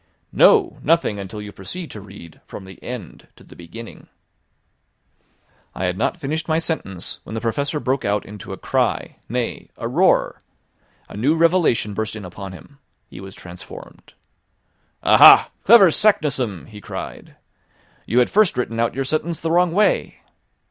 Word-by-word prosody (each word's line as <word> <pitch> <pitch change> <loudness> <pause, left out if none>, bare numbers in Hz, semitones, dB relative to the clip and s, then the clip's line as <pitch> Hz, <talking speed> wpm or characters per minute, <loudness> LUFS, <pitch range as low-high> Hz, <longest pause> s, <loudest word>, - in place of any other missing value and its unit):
"No, 400 -7 +4
nothing 165 -11 +1
until 100 +2 -7
you 105 - -9
proceed 165 - -8
to 105 - -9
read 95 -5 -14
from 95 - -9
the 95 0 -14
end 120 -9 -8
to - - -18
the - - -16
beginning." 110 +7 -11 1.7
I - - -4
had 90 0 -1
not 95 - -1
finished 160 0 -4
my 160 -1 +1
sentence 160 - -4
when 110 - -8
the - - -2
Professor 140 +6 -2
broke 135 -1 -1
out 105 0 -1
into 105 -1 -10
a - - -6
cry, - - -1
nay, - - -4
a - - -4
roar. - - +2 0.7
A - - -12
new 135 +10 +1
revelation 165 - +2
burst 110 +2 -3
in 105 -3 -8
upon 95 +2 -8
him. 140 +10 -14 0.3
He - - -10
was 95 -1 -10
transformed! 90 +2 -12 0.9
"Aha, - - +8
clever 200 -5 +7
Saknussemm!" 135 - +1
he 105 -2 -12
cried. - - -8 0.7
"You 115 - -1
had 125 - +3
first 205 -9 +3
written 115 -2 -2
out 115 0 0
your 135 0 -2
sentence 155 +4 -2
the 165 - -3
wrong 175 0 +3
way." 205 +5 0
120 Hz, 160 wpm, -21 LUFS, 100-160 Hz, 1.7 s, Aha